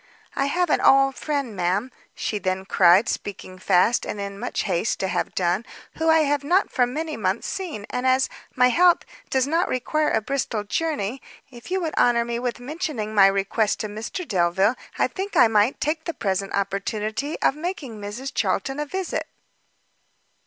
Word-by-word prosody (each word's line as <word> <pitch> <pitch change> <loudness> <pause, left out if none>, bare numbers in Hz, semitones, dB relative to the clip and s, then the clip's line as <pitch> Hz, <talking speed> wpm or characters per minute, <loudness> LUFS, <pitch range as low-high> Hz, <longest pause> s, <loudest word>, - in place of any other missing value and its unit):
"I 275 - +1
have 350 +2 0
an - - +3
old 270 0 +5
friend, 280 -7 -3
ma'am," 190 +7 0 0.2
she 210 - -2
then 185 0 -2
cried, 190 +4 +5
speaking 185 -5 -5
fast, 185 +6 +3
and 210 - -5
in 200 0 -5
much 245 - -2
haste 190 +2 -1
to 190 - 0
have 180 -1 -2
done, 180 +3 +1 0.4
"who 320 0 +2
I 320 0 +6
have 290 -1 +1
not 360 +7 +2
for 245 -1 +2
many 310 +4 -4
months 195 0 -1
seen, 340 - -5
and, 250 +1 -1
as 260 0 +3 0.3
my 250 0 +5
health 350 +6 +4 0.2
does 260 -1 +2
not 330 +5 +1
require 300 +4 0
a - - +2
Bristol 230 -2 -2
journey, 265 -1 -2 0.3
if 240 +3 -12
you 380 +1 0
would 320 -2 -2
honour 235 -1 +4
me 235 0 -3
with 245 -1 -3
mentioning 270 -6 -4
my 200 -2 +7
request 195 +2 0
to 215 - -3
Mr 225 - -6
Delvile, 190 +3 +2 0.2
I - - +3
think 395 +1 -6
I - - +8
might 215 +3 +2
take 315 +1 -1
the 335 - -4
present 195 -1 -1
opportunity 210 +7 -2
of - - +2
making 300 - -5
Mrs 240 +7 -6
Charlton 215 +7 -1
a 295 - -2
visit." 375 +3 -3
240 Hz, 180 wpm, -24 LUFS, 200-295 Hz, 0.4 s, I